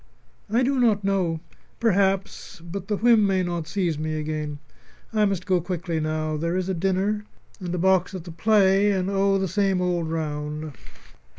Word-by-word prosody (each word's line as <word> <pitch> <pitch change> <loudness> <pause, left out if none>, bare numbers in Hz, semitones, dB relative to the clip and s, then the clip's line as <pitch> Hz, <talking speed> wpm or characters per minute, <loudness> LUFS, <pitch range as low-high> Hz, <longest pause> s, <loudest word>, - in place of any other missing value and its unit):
"I 235 +4 +2
do 270 +1 +1
not 215 -4 +3
know. 185 -5 0 0.4
Perhaps 195 -5 0
but 175 +3 -7
the 210 - 0
whim 225 -2 +5
may 190 -1 +1
not 175 -3 -3
seize 175 -4 -1
me 155 0 -2
again. 150 -1 -3 0.6
I 215 -1 +3
must 195 -3 -1
go 185 -3 +2
quickly 175 -1 -3
now. 155 0 -1
There 170 +3 -1
is 185 -1 -1
a 190 - 0
dinner, 195 +4 0 0.4
and 180 -2 -4
a - - -2
box 190 +1 +2
at 180 - -6
the 170 - -9
play 195 +2 +3
and, 190 0 0
oh! 195 0 +2
the 190 0 0
same 195 0 +1
old 175 -2 0
round. 150 -1 -4
185 Hz, 180 wpm, -24 LUFS, 165-195 Hz, 0.6 s, whim